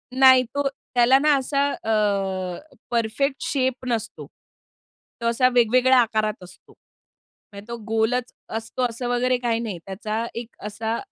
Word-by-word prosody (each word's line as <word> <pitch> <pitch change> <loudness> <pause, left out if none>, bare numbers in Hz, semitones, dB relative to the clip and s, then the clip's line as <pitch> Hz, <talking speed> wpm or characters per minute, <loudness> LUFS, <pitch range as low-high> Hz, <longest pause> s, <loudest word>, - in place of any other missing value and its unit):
नाही. 260 -1 +7
तो 275 +4 -2 0.3
त्याला 245 +2 +6
ना 300 +1 +4
असा 280 +1 0
अ, 195 -4 -1 0.3
परफेक्ट 240 +4 0
शेप 260 -3 -1
नसतो. 230 -3 -3 0.9
तो - - -4
असा 245 +2 +3
वेगवेगळ्या 250 +2 +4
आकारात 215 -3 -1
असतो. 180 0 -16 0.8
म्हणजे 200 +2 -11
तो 235 - -5
गोलच 225 +3 0 0.3
असतो 225 +3 -4
असं 235 +2 -5
वगैरे 250 +1 +1
काही 230 -1 +1
नाही. 215 -6 -4
त्याचा 215 +4 -3
एक 235 0 -5 0.2
असा 220 +2 -3
235 Hz, 135 wpm, -23 LUFS, 215-255 Hz, 0.9 s, नाही